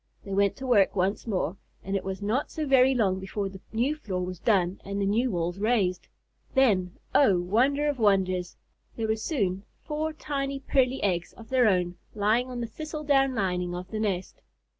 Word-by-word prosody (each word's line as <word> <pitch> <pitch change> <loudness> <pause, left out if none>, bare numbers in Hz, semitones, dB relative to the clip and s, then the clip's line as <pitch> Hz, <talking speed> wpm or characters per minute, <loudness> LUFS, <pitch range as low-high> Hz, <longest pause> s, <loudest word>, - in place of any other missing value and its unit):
They 195 - -6
went 200 0 +2
to 265 - -7
work 210 -7 +4
once 195 +4 0
more, 185 -4 -1 0.3
and 195 +1 -3
it 195 - -1
was 190 +1 -5
not 230 +8 0
so 310 - -3
very 265 -1 +5
long 195 -6 +1
before 195 +1 -3
the 190 -1 -11
new 240 +6 +1
floor 185 -11 -3
was 180 -1 -6
done 190 -4 +1
and 200 +1 -4
the 200 - +1
new 230 +6 +2
walls 175 -1 -2
raised. 200 -5 +1 0.5
Then, 195 -9 +3 0.2
oh, 210 -11 +5
wonder 255 +11 +2
of 290 -3 -1
wonders! 185 -4 +1 0.4
there 225 -1 -2
were 220 - +2
soon 205 - -1 0.2
four 310 +1 -2
tiny, 275 -3 -3
pearly 265 -1 +1
eggs 175 -3 0
of 225 -1 -14
their 255 -3 +4
own 180 -3 +1 0.2
lying 215 +5 +2
on 245 -1 -4
the - - -1
thistle 305 +5 -6
down 270 -2 +3
lining 180 -4 -1
of 180 +1 -7
the 215 - -3
nest. 190 -4 -2
210 Hz, 195 wpm, -27 LUFS, 185-260 Hz, 0.5 s, very